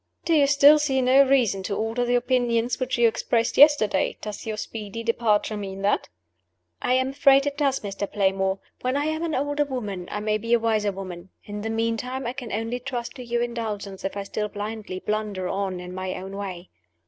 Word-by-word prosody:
"Do 335 - +2
you 290 -3 +5
still 285 +2 +7
see 275 -3 +1
no 260 +2 +5
reason 255 -8 +3
to 200 +1 -3
alter 225 +2 -1
the 245 0 +1
opinions 245 -1 +1
which 255 -1 -1
you 240 -1 +5
expressed 230 +1 0
yesterday? 280 -10 +5
Does 210 +1 -7
your 215 -1 -3
speedy 220 +1 -6
departure 225 -2 +1
mean 195 -1 -6
that?" 205 - +1 0.7
"I 250 - +1
am 260 +1 +2
afraid 275 0 +4
it 285 -1 -1
does, 280 -2 +1
Mr. 200 0 -4
Playmore. 190 -1 +1 0.2
When 255 +2 0
I 290 - 0
am 315 +1 -1
an 325 -2 -1
older 290 +2 0
woman, 210 -10 -5
I 210 - -2
may 215 0 0
be 230 +2 -1
a 235 - +5
wiser 215 -2 +1
woman. 185 -2 -8
In 205 0 -6
the 220 - -3
meantime, 230 +4 -2
I 240 - -2
can 255 -4 -7
only 225 +3 -2
trust 245 -2 -5
to 250 - -7
your 240 0 -1
indulgence 215 -5 -4
if 195 +1 -3
I 200 - -2
still 210 +1 -3
blindly 210 -2 -5
blunder 210 -2 -2
on 190 -2 -2
in 180 0 -8
my 185 0 -4
own 190 +1 -7
way." 190 -3 -6
225 Hz, 205 wpm, -25 LUFS, 200-255 Hz, 0.7 s, still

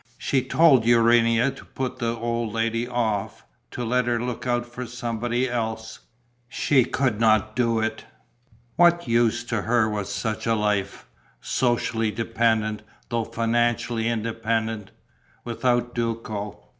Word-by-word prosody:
She 135 - 0
told 135 -1 +4
Urania 115 +1 +4
to - - -12
put 130 -1 -5
the 115 -1 -1
old 115 -1 -2
lady 115 +1 -1
off, 115 -5 -2 0.3
to 120 - -5
let 125 +1 +1
her 120 -1 +1
look 125 +1 -4
out 120 -1 0
for 120 +1 -7
somebody 120 +1 -2
else. 110 -2 -4 0.5
She 135 -1 +2
could 125 -5 0
not 110 -1 +3
do 115 -2 +1
it. 110 0 -3 0.7
What 175 -3 +4
use 120 0 +2
to 115 -3 -2
her 115 +1 +2
was 105 -2 -3
such 110 +2 -3
a 115 - +3
life 105 -2 -1 0.3
socially 120 -2 0
dependent, 110 -1 0 0.3
though 115 -2 -1
financially 115 0 0
independent 115 -2 -2 0.5
without 120 0 0
Duco? 115 -3 -4
115 Hz, 130 wpm, -24 LUFS, 110-120 Hz, 0.7 s, told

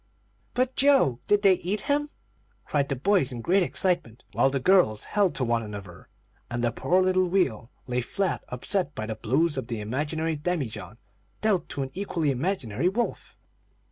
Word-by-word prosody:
"But 255 +1 +1
Joe 270 - +4
did 205 0 +3
they 195 -1 +7
eat 185 +3 -2
him?" 295 +1 0 0.6
cried 140 -2 0
the 140 - 0
boys 150 -1 +2
in 120 -2 -5
great 185 +10 +3
excitement, 175 - 0
while 120 +5 +3
the 135 0 -1
girls 130 - +3
held 200 -4 +1
to 130 - 0
one 115 -1 +1
another, 100 -5 -9 0.4
and 120 0 -3
the 120 - +2
poor 185 +8 +2
little 185 0 +2
wheel 170 - 0 0.2
lay 125 0 -1
flat, 190 - -2
upset 145 +5 -1
by 110 - -3
the 110 - -3
blows 135 +9 0
of 130 - -3
the 115 -3 -4
imaginary 150 +9 -2
demijohn, 140 - -3 0.4
dealt 210 -5 +1
to 140 - -3
an 135 - -6
equally 170 -6 -1
imaginary 140 - -1
wolf. 235 +5 -3
150 Hz, 175 wpm, -26 LUFS, 120-190 Hz, 0.6 s, they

